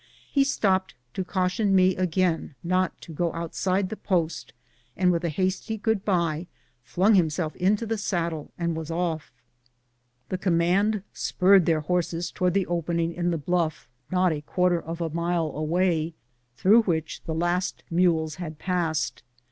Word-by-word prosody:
He 275 - +4
stopped 190 -8 +1 0.2
to 190 - -2
caution 190 +2 +1
me 185 0 +4
again 180 -4 0
not 185 +2 0
to 170 - -10
go 170 +2 0
outside 185 +3 -1
the 220 - -4
post, 170 - -1 0.5
and 180 -1 +4
with 170 0 0
a 170 - 0
hasty 190 +7 -1
good 220 -2 0
bye 170 -4 0 0.3
flung 190 - +2
himself 160 -3 +1
into 200 +5 +2
the 225 -1 -2
saddle 170 -6 -2
and 170 -1 -1
was 160 -1 -5
off. 165 -2 -2 1.0
The 185 - -2
command 190 +4 +2
spurred 190 -2 +4
their 160 -2 +3
horses 170 +1 -1
towards 180 0 0
the 195 -2 +2
opening 170 0 -1
in 175 0 -1
the 170 - 0
bluff, 160 0 -1 0.2
not 185 -1 +2
a 150 -2 -3
quarter 180 +2 +1
of 165 +1 -6
a 165 -2 -2
mile 170 -1 0
away, 160 +1 0 0.4
through 210 - +6
which 160 -7 -2
the 160 - -3
last 175 +2 -1
mules 165 -3 +2
had 155 -3 -6
passed. 170 -3 -1
175 Hz, 155 wpm, -26 LUFS, 165-185 Hz, 1.0 s, through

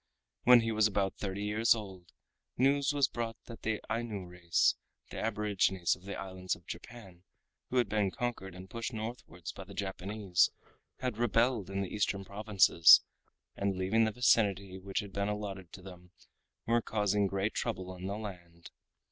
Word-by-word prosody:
When 125 -1 +8
he 115 0 -1
was 110 -1 +4
about 100 -2 -1
thirty 100 0 -3
years 110 +3 +3
old, 95 -5 -9 0.5
news 140 +3 +3
was 140 -2 +3
brought 115 -2 -4
that 115 -2 -10
the 110 -1 -1
Ainu 115 -5 -3
race, 90 -1 +2 0.4
the - - -5
aborigines 95 -4 +1
of 90 - -19
the 100 - -5
islands 95 -1 -3
of - - -19
Japan, 100 -7 -10 0.5
who 130 - -1
had 120 -3 +3
been 105 -1 +1
conquered 95 -3 -4
and 90 +1 -10
pushed 115 +5 -5
northwards 110 -6 -6
by - - -9
the - - -12
Japanese, 95 -1 0 0.5
had 125 -4 -2
rebelled 120 -3 +2
in 95 0 -2
the 95 - -4
Eastern 100 -1 -1
provinces, 100 -5 +6 0.5
and 100 -1 -1
leaving 105 +5 +2
the 110 - 0
vicinity 100 -5 +2
which 95 0 -2
had 100 -2 -10
been 100 +1 -1
allotted 100 -4 -5
to 95 - -10
them 90 -1 -12 0.6
were 120 +1 +2
causing 105 -2 +1
great 100 +2 -1
trouble 95 -6 -3
in 90 +1 -6
the 100 +1 -3
land. 85 -5 -9
100 Hz, 170 wpm, -32 LUFS, 95-115 Hz, 0.6 s, When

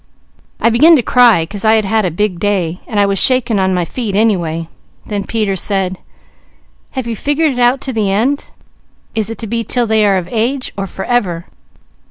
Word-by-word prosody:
I 230 - +2
began 310 +9 +6
to 260 - +1
cry, 235 -10 +4
'cause 200 +4 -7
I 220 0 +4
had 215 -2 +1
had 220 +1 +1
a - - +1
big 180 +1 -2
day, 185 -4 -1
and 215 -3 -2
I 200 - +4
was 195 -1 +1
shaking 245 -5 +2
on 190 0 +1
my 175 -1 0
feet 220 0 -4
anyway. 170 -7 0 0.4
Then 205 -2 -4
Peter 210 -3 -1
said, 190 -1 -1 0.9
'Have 260 -2 -3
you 230 -1 -3
figured 290 +6 0
it 250 - -5
out 245 +2 +3
to 265 - -3
the 210 -4 0
end? 250 +8 0 0.6
Is 220 -1 -1
it 225 - -6
to 230 - -5
be 230 +2 -2
'til 245 +1 0
they 220 -1 +2
are 200 -2 +3
of 180 -2 -4
age, 245 +4 -1
or 195 -1 -4
forever?' 190 -5 -2
215 Hz, 205 wpm, -15 LUFS, 195-240 Hz, 0.9 s, began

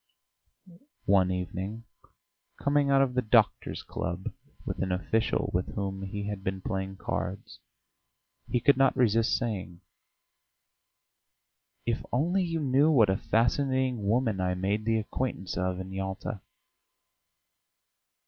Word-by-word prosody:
One 95 -2 +4
evening, 95 +4 -3 0.8
coming 140 0 +2
out 135 0 +5
of 130 -2 -1
the 125 - +2
doctors' 110 -1 +2
club 85 +3 -4 0.3
with - - -4
an 95 -1 -1
official 100 +5 0
with 90 +1 -1
whom 95 -1 -3
he 100 +1 -4
had 105 -2 -4
been 95 0 -2
playing 95 -1 -3
cards, 95 +1 -4 0.9
he 125 - +2
could 135 +3 +4
not 135 0 +3
resist 115 -2 +3
saying: 95 -7 -4 2.0
"If 115 -1 -1
only 170 +9 +2
you 165 -2 -1
knew 140 +2 +4
what 115 -10 +5
a 95 - +1
fascinating 125 -1 +1
woman 110 -4 +1
I 90 0 0
made 100 +4 -1
the 115 0 +2
acquaintance 110 -3 -3
of 90 0 -1
in 95 0 -6
Yalta!" 95 +1 -4
105 Hz, 125 wpm, -29 LUFS, 95-125 Hz, 2.0 s, out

